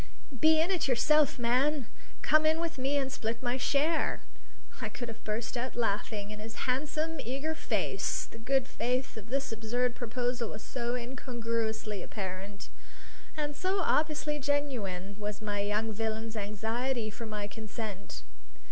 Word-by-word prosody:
"Be 315 +3 +7
in 335 +4 +3
it 360 -6 +2
yourself, 295 +3 +5
man! 255 +3 +3 0.4
Come 310 0 +5
in 315 +1 +4
with 335 -3 -2
me 275 +2 +2
and 270 -1 +1
split 230 +1 -2
my 245 0 +2
share!" 290 +5 +2 0.6
I - - -1
could 240 -2 -5
have 225 - -8
burst 220 +2 -2
out 250 +2 -2
laughing 210 -2 0
in 210 - -7
his 220 +1 -4
handsome, 305 +5 0
eager 275 +6 -1
face; 315 - 0
the 230 - -12
good 265 +3 +2
faith 250 +2 0
of 220 -1 -8
this 275 +1 0
absurd 240 +3 +1
proposal 245 -1 -1
was 210 - -6
so 240 -1 -1
incongruously 230 -4 -2
apparent; 195 0 -5 0.7
and 295 -1 -1
so 375 +4 +1
obviously 300 -2 +2
genuine 230 -10 0
was 210 0 -2
the 205 -2 -1
young 215 +2 +1
villain's 220 +1 -2
anxiety 220 +3 -1
for 230 +1 -6
my 210 -1 -2
consent. 205 - -5
240 Hz, 150 wpm, -32 LUFS, 215-280 Hz, 0.7 s, Be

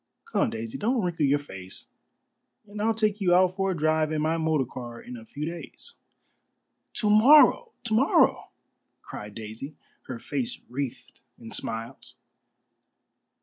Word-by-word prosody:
"Come, - - +1
Daisy, 115 0 -5
don't 240 +4 +1
wrinkle 165 -5 +1
your 140 +1 +4
face, 95 -10 -9 0.8
and 205 +1 -6
I'll 225 +1 +2
take 215 -1 +1
you 175 -2 +4
out 185 0 +4
for 195 0 0
a 185 - -1
drive 155 0 +2
in 155 - 0
my 160 +2 +1
motor 160 -4 +1
car 120 -1 -8
in 125 - -9
a 115 -2 -10
few 145 +6 -5
days." 170 - -6 1.0
"To 210 - +1
morrow! 295 - +7
to 230 -2 -2
morrow!" 260 +7 +3 0.5
cried 105 -1 -8
Daisy, 115 +7 -7 0.3
her 125 - -5
face 245 - -4
wreathed 130 0 -5 0.2
in 115 -1 -10
smiles. 115 +1 -4
155 Hz, 145 wpm, -27 LUFS, -, 1.0 s, morrow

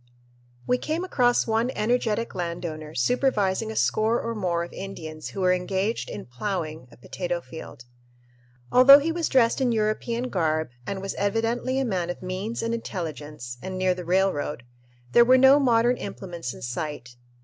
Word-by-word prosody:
We 250 - +1
came 320 +3 -2
across 245 -9 +2
one 225 +2 +1
energetic 230 0 0
landowner 170 -3 -5
supervising 220 - +1
a - - -7
score 220 +3 +2
or 230 - -3
more 180 -5 -1
of 170 - -9
Indians 160 -5 -7
who 195 - -6
were 180 0 +4
engaged 190 +4 -1
in - - -7
"ploughing" 155 +1 -4
a - - -16
potato 175 +7 -4
field. 160 -7 -10 0.9
Although 265 +3 +9
he 300 +3 0
was 335 0 -1
dressed 250 -1 +3
in 250 -2 +2
European 230 +3 -1
garb 155 - 0 0.2
and 195 -1 -4
was 195 - -3
evidently 225 +5 0
a 270 - +1
man 185 -6 -1
of 175 - -5
means 190 +6 -4
and 230 0 -1
intelligence, 150 - -6
and 185 0 -5
near 185 0 +2
the 180 0 -7
railroad, 175 -7 0 0.5
there 235 - +7
were 255 +2 +6
no 265 +2 +7
modern 240 -2 +3
implements 175 -8 -6
in - - -11
sight. 125 -1 -5
195 Hz, 165 wpm, -25 LUFS, 170-235 Hz, 0.9 s, Although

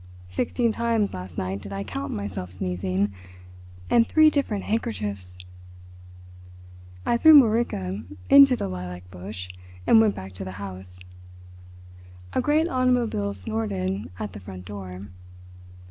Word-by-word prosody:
Sixteen 230 - 0
times 225 -2 0
last 90 -1 -8
night 95 +2 -3
did 100 - -9
I 100 0 -3
count 95 -2 -5
myself 95 -3 -5
sneezing. 95 +2 -2 0.7
And 230 -1 +4
three 310 -1 +6
different 225 -9 -1
handkerchiefs." 100 - -3 1.7
I 235 - +2
threw 310 +3 +9
Mörike 160 - 0 0.2
into 275 -2 +8
the - - -3
lilac 90 -1 -7
bush, 90 0 -8 0.4
and 225 - +7
went 215 -2 +2
back 95 0 -8
to 90 - -6
the 95 0 -6
house. 95 -2 -8 1.3
A - - +2
great 305 +5 +2
automobile 245 - +1
snorted 95 -2 -3
at 100 -1 -5
the 100 - -8
front 90 -1 -10
door. 95 -2 -7
100 Hz, 130 wpm, -25 LUFS, -, 1.7 s, threw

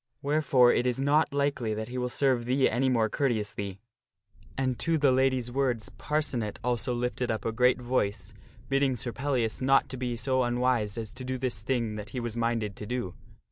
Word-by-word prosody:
Wherefore, 140 -4 +4
it 125 - +1
is 125 0 0
not 145 +3 +3
likely 140 -6 0
that 110 +2 -5
he 125 +1 -4
will 125 0 -1
serve 130 -2 +1
thee 130 +2 +3
any 130 +4 +1
more 115 -3 +2
courteously." 105 -6 -2 0.8
And 130 -2 -1
to 165 -1 +1
the 145 -3 +4
lady's 130 -2 +1
words 125 -4 -1
Parcenet 140 -8 -2
also 125 0 0
lifted 125 0 -2
up 110 - -2
a 115 - +1
great 125 +3 +3
voice, 120 -5 -1 0.3
bidding 135 -1 +2
Sir 120 0 -4
Pellias 130 -5 -1
not 135 +1 +3
to 130 - -5
be 120 -1 -3
so 130 +2 +1
unwise 120 -4 +1
as 110 -1 -5
to 130 - -8
do 130 0 -3
this 125 -5 -2
thing 115 -3 -1
that 105 -1 -7
he 130 - -4
was 120 -2 -4
minded 115 -3 -1
to 105 - -7
do. 120 -7 -3
125 Hz, 195 wpm, -28 LUFS, 115-130 Hz, 0.8 s, Wherefore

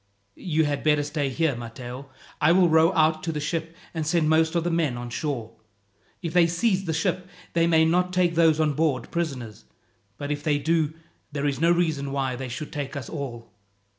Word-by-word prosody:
"You 160 - 0
had 145 -1 -2
better 150 -1 +3
stay 145 -1 -2
here, 150 +1 0
Matteo. 120 +3 -8 0.3
I 155 +3 +5
will 180 -1 +5
row 160 +2 +5
out 155 -2 +3
to 165 - -2
the 150 - -3
ship, 165 +2 -3 0.2
and 160 -2 -2
send 160 0 +1
most 160 +1 +3
of 170 - +2
the 175 - -1
men 160 -7 0
on 120 0 -6
shore. 125 -5 -3 0.7
If 165 -2 -3
they 175 -2 +5
seize 190 +3 +1
the 165 - -1
ship, 180 +3 -1 0.3
they 170 0 +3
may 160 -1 +4
not 180 +2 +2
take 180 -2 +2
those 160 -2 +4
on 155 -2 +2
board 140 -5 0
prisoners; 125 - -4 0.5
but 145 +1 -4
if 145 0 -2
they 150 -1 +1
do, 155 +1 0 0.4
there 145 0 -2
is 140 -1 -1
no 170 - +4
reason 160 -5 0
why 135 -2 -1
they 130 0 -5
should 130 +5 -6
take 145 -1 -4
us 135 -5 -5
all." 120 -7 -6
155 Hz, 205 wpm, -25 LUFS, 140-165 Hz, 0.7 s, I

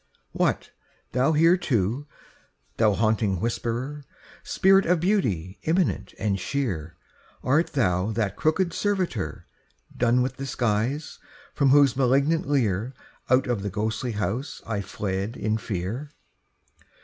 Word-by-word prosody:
What, - - 0 0.4
thou 130 +4 +2
too - - +1
here, 145 - +2 0.7
Thou 110 -2 +4
haunting 110 -3 +1
whisperer? 120 +6 -3 0.4
Spirit 195 0 +3
of 175 0 +3
beauty 105 - 0
immanent 170 +2 0
and 100 -3 -1
sheer, 90 - -3 0.5
Art 150 +6 +2
thou 95 - +1
that 105 -3 -1
crooked 170 - +1
servitor, 185 - -2 0.5
Done 125 +1 +3
with 130 - -3
disguise, 130 +1 -1 0.3
from 140 -2 +2
whose 140 -2 +5
malignant 140 +6 +2
leer 120 -3 0 0.3
Out 130 +1 +4
of 120 -5 -1
the 100 - -3
ghostly 110 +4 -2
house 105 - -3
I 105 -3 -2
fled 100 +3 -3
in 110 +1 -1
fear? 110 +9 -4
120 Hz, 120 wpm, -25 LUFS, 105-145 Hz, 0.7 s, whose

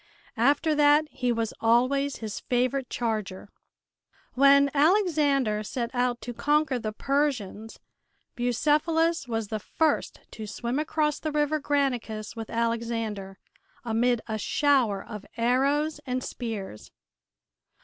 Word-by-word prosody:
After 285 +6 +3
that 295 +1 +5
he 250 -1 -1
was 230 -1 -1
always 255 +5 +2
his 220 -2 -6
favorite 255 +1 -1
charger. 215 -5 -3 0.8
When 280 +1 +5
Alexander 290 - +2
set 235 +2 -4
out 245 -1 0
to 240 - -6
conquer 295 0 +1
the 215 -2 -3
Persians 230 -5 -2 0.6
Bucephalus 305 +6 +1
was 225 -3 -3
the 215 - -2
first 310 +8 -1
to 215 -1 -7
swim 240 +5 -3
across 305 -1 0
the 310 - -3
River 300 +1 +1
Granicus 250 -8 -1
with 225 -1 -6
Alexander, 230 -4 -2 0.5
amid 235 +1 +1
a 220 -1 -3
shower 255 -6 +2
of 210 -3 -8
arrows 280 +6 +1
and 255 0 -2
spears. 210 - -6
250 Hz, 120 wpm, -27 LUFS, 225-290 Hz, 0.8 s, that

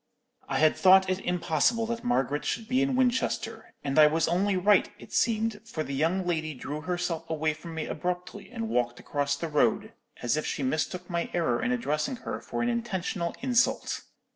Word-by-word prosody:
"I - - 0
had 155 0 +4
thought 190 0 +6
it 185 - -1
impossible 180 - +1
that 235 +1 -4
Margaret 145 - 0
should 225 - -2
be 255 +2 +2
in 265 -1 +1
Winchester, 255 0 0
and 140 +2 +1
I 150 - +9
was 160 +2 +1
only 185 +3 +1
right, 200 +3 +4
it - - -13
seemed, 225 -2 +1
for 225 -9 -4
the 140 - -5
young 165 +7 +1
lady 155 -3 -1
drew 145 +4 -5
herself 170 -1 -3
away 155 -1 0
from 160 +2 -9
me 160 - -2
abruptly 180 +4 -4
and 230 -2 -4
walked 120 - 0
across 140 -1 -1
the 165 - -4
road, 150 -2 +1 0.3
as 120 +3 +2
if 155 - -1
she 140 - -2
mistook 160 +6 -1
my 170 -1 -2
error 155 -9 +1
in 250 - 0
addressing 230 - -1
her - - -6
for - - -3
an 235 - +1
intentional 195 -7 -2
insult. 255 -1 +1
175 Hz, 190 wpm, -28 LUFS, 155-225 Hz, 0.3 s, I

